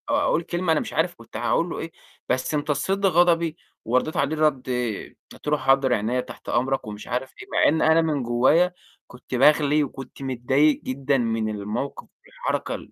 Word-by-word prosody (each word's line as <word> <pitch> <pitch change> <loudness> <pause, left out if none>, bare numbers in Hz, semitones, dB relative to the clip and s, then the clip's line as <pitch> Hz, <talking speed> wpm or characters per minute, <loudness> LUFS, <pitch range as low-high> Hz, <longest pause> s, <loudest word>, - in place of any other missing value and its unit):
أقول 280 - +1
كلمة 175 0 -1
أنا 160 - +3
مش - - -6
عارف 170 +2 0
كنت 115 - -10
هاقول 120 +9 +1
له - - -5
إيه، 165 - -6 0.4
بس 130 +4 0
امتصّيت 170 +7 0
غضبي، 170 -2 +3 0.3
وردّيت 125 +7 0
عليه 150 +3 0
رَد 150 -5 +1 0.7
قُلت - - -14
له: 150 0 +2
"حاضر 135 -2 +3
عينيا، 120 +3 0
تحت - - -11
أمرك،" 130 -1 0
ومش 105 0 -8
عارف 125 +2 -3
إيه، - - -11
مع - - +4
إن 160 +2 +2
أنا 165 +1 +5
من 150 -5 -1
جوّايا 130 +10 +3 0.3
كنت 125 +1 -8
باغلي 150 +2 +4
وكنت 135 -1 -8
متضايق 135 +3 +2
جدًا 135 +1 0
من 115 -3 -1
الموقِف 105 +6 -4 0.2
والحركة - - -3
ال - - -11
140 Hz, 175 wpm, -24 LUFS, 125-160 Hz, 0.7 s, أنا